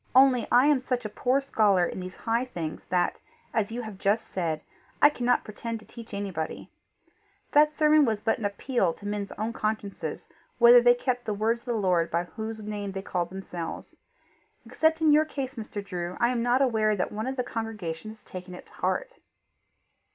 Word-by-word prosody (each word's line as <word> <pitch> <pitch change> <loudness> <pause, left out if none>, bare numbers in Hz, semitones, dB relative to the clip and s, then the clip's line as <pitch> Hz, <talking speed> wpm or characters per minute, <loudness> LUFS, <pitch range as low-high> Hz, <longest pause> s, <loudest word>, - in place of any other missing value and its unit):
Only 260 -3 +6
I 250 +2 +6
am 290 -3 +4
such 250 -2 -2
a - - -2
poor 250 +5 +1
scholar 210 -9 +3
in - - -5
these 185 0 -7
high 230 +2 0
things 170 -11 -6
that, 180 0 +1 0.4
as 220 -1 0
you 240 +1 -4
have 215 -3 -8
just 205 +3 +1
said, 165 -4 -2 0.4
I 295 - +8
cannot 245 -3 +1
pretend 230 +2 -5
to 215 - -17
teach 230 -2 -11
anybody. 195 -6 -4 0.8
That 300 +1 +4
sermon 305 -1 +5
was 220 -5 +1
but 225 +2 0
an 215 - -3
appeal 200 -2 0
to 205 - -13
men's 205 -1 -3
own 220 +2 -3
consciences 215 -2 -3 0.3
whether 240 0 +8
they 245 0 +6
kept 245 0 -2
the 210 - -1
words 225 +3 0
of - - -29
the 240 - 0
Lord 180 -6 +2
by 170 +1 0
whose 220 +4 -6
name 205 -2 -4
they 195 0 -5
called 175 -3 -2
themselves. 180 -3 -7 0.7
Except 320 0 +1
in 315 -1 +5
your 305 +1 +6
case, 275 -4 -5
Mr. 215 -3 -6
Drew, 180 -2 -4
I 235 - +3
am 245 -2 0
not 245 +3 +3
aware 220 -4 +2
that 185 - -2
one 215 +3 -3
of 265 - -2
the 250 - -1
congregation 215 -6 -5
has 220 0 -12
taken 180 0 -8
it - - -11
to - - -22
heart." - - -2
220 Hz, 200 wpm, -27 LUFS, 195-245 Hz, 0.8 s, I